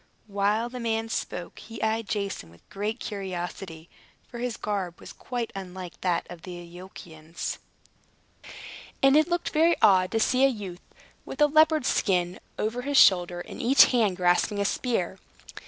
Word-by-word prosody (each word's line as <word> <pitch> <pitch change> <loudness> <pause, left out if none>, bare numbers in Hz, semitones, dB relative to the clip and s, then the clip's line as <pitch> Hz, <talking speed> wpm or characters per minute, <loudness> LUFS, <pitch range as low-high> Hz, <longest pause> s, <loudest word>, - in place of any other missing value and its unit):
While 205 +2 0
the 250 0 -7
man 225 -1 -1
spoke 175 -5 -4
he 225 -1 -10
eyed 220 0 -1
Jason 200 - -3
with 85 0 -21
great 210 +4 -3
curiosity; 180 -4 -6 0.4
for 240 - -9
his 245 -1 -3
garb 190 -5 -3
was - - -11
quite 240 -2 -5
unlike 185 -2 -8
that 180 -2 0
of 175 -2 -10
the 180 0 -8
Iolchians, 170 -2 -8 1.4
and 270 +1 +6
it 310 +1 +5
looked 345 -1 -1
very 330 +2 +4
odd 185 -2 +5
to 225 - 0
see 255 +4 +2
a - - +8
youth 200 -8 -5 0.4
with - - -9
a 295 - +7
leopard's 310 -1 +4
skin 180 -3 0 0.2
over 225 +3 -2
his 280 +2 0
shoulders, 175 -4 +5
and - - -7
each 265 +4 +6
hand 215 -7 +2
grasping 180 +3 +2
a 200 - +1
spear. 195 -5 -1
205 Hz, 160 wpm, -26 LUFS, 180-240 Hz, 1.4 s, a